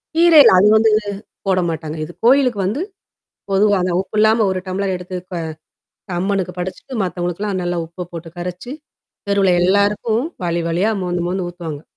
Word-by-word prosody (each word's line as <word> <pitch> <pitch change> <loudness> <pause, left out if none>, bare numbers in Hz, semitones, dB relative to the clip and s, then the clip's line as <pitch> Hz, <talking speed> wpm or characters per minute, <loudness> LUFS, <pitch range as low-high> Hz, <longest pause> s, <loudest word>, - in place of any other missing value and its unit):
கீரை 335 -2 +7
இல்ல, - - +7
அது 205 - +5
வந்து 220 0 +4 0.6
போடமாட்டாங்க. 165 -4 -1
இது 175 - -11
கோயிலுக்கு 255 -5 +4
வந்து. 255 - -2 0.7
பொதுவா 200 +1 +3
அந்த 180 - 0
உப்பு 195 +3 -4
இல்லாம 220 +1 +4
ஒரு 185 -1 -2
டம்ளர் 190 +1 -2
எடுத்து 180 0 -6 0.2
க - - -3 0.8
அம்மனுக்கு 190 -1 -1
படைச்சிட்டு 185 +8 -6
மத்தவுங்களுக்குல்லாம் 185 +2 -2
நல்லா 175 0 -2
உப்ப 170 +1 -8
போட்டு 165 0 -7
கரைச்சு, 180 +7 -6 0.6
தெருவுல 195 -2 +3
எல்லாருக்கும் 205 +5 +2 0.2
வாளி 170 0 0
வாளியா 180 +7 +1
மோந்து, 175 -1 -2
மோந்து 185 0 -2
ஊத்துவாங்க. 165 -4 -7
185 Hz, 150 wpm, -19 LUFS, 175-210 Hz, 0.8 s, கீரை